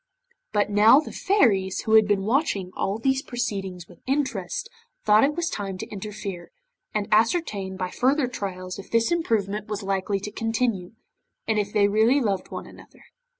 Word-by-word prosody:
But 205 0 +1
now 215 +6 +7
the 310 - -6
Fairies 210 - +2
who 220 - -1
had 220 -1 +7
been 200 -2 +1
watching 215 - 0
all 195 +2 -1
these 265 +3 +1
proceedings 195 - -4
with 175 - -18
interest, 260 - -1 0.4
thought 210 0 +6
it 290 +2 +2
was 340 0 -1
time 195 - -4
to 220 - -5
interfere, 200 -3 -6 0.4
and 210 -1 -2
ascertain 215 - +1
by 185 -1 -3
further 270 +3 +2
trials 185 -6 -5
if 195 - -10
this 230 +3 +2
improvement 215 - 0
was 210 -1 -4
likely 195 +1 -1
to 210 - -6
continue, 225 -4 -1 0.5
and 220 -1 +2
if 205 0 -2
they 205 -2 +3
really 220 +7 +3
loved 200 -7 -1
one - - -6
another. - - -16
210 Hz, 170 wpm, -25 LUFS, 195-240 Hz, 0.5 s, now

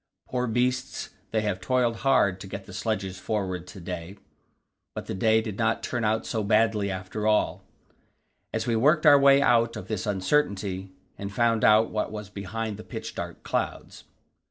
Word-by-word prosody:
Poor 125 0 -1
beasts, 125 +2 -1 0.2
they 110 - 0
have 105 -3 -2
toiled 120 +2 +1
hard 120 -9 +2
to 95 - -8
get 95 0 -7
the 95 - -11
sledges 95 -3 -3
forward 95 -4 -3
to 100 - -10
day." 90 +2 -6 0.8
But - - -5
the - - -4
day 110 +3 +3
did 105 -3 -6
not 110 0 +1
turn 120 -2 -2
out 110 +1 +1
so 110 -2 -2
badly 105 -1 +2
after 95 +3 -3
all, 105 0 +2 0.9
as 110 0 -2
we 120 -2 +1
worked 150 +8 +3
our 145 -1 +8
way 140 0 +6
out 115 -2 +3
of - - -8
this 110 -2 -3
uncertainty 95 -3 0 0.3
and 100 0 -5
found 115 +1 +2
out 110 +1 +5
what 105 0 -2
was 105 -2 -7
behind 105 +2 -4
the 110 - -9
pitch - - -7
dark - - -6
clouds. - - -3
110 Hz, 180 wpm, -26 LUFS, 100-115 Hz, 0.9 s, our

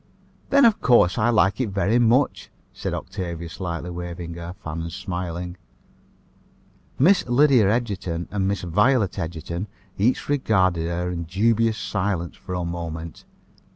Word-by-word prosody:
"Then, 280 0 +6
of 225 -2 +4
course, 115 -8 +4
I 115 +3 +3
like 110 -1 +3
it 120 - -1
very 100 +4 +1
much," 120 +4 +2 0.2
said - - -3
Octavia, 85 -2 -5
slightly 85 +1 -5
waving 85 -1 -6
her 85 +1 -7
fan 80 +1 -4
and 85 0 -5
smiling. 90 -1 -5 1.4
Miss 180 +8 +5
Lydia 125 -4 +5
Egerton 100 -7 -2
and 95 -2 0
Miss 100 -2 -1
Violet 105 +4 +2
Egerton 85 +3 -4 0.3
each 115 +6 +1
regarded 95 - +2
her 90 +1 -2
in 85 -1 -4
dubious 110 +5 +1
silence 95 -4 -2
for 90 -1 -7
a 90 -1 -2
moment. 85 -1 -6
95 Hz, 140 wpm, -23 LUFS, 85-110 Hz, 1.4 s, Then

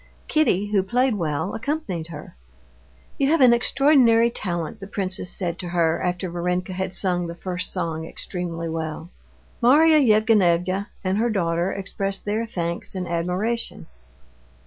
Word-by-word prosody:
Kitty, 205 - +1
who 200 -2 +3
played 245 +6 +1
well, 160 -1 -2
accompanied 225 - -3
her. 150 - -10 0.8
"You 275 - +3
have 325 +2 +3
an 250 -3 +7
extraordinary 235 -2 +4
talent," 170 -7 -4
the 195 - -8
princess 190 -3 -2
said 175 -2 -4
to 180 - -5
her 170 -2 +1
after 180 0 -2
Varenka 180 +2 -2
had 190 0 -3
sung 180 -2 0
the 170 - -6
first 180 +1 -3
song 165 -3 -3
extremely 170 -2 -5
well. 160 +1 -5 0.5
Marya 305 +6 +6
Yevgenyevna 205 - +3 0.2
and 190 +2 0
her 235 +2 +2
daughter 175 -3 0
expressed 195 0 -3
their 215 +3 -1
thanks 170 -3 -4
and 180 -2 -3
admiration. 180 - -2
185 Hz, 145 wpm, -23 LUFS, 170-225 Hz, 0.8 s, an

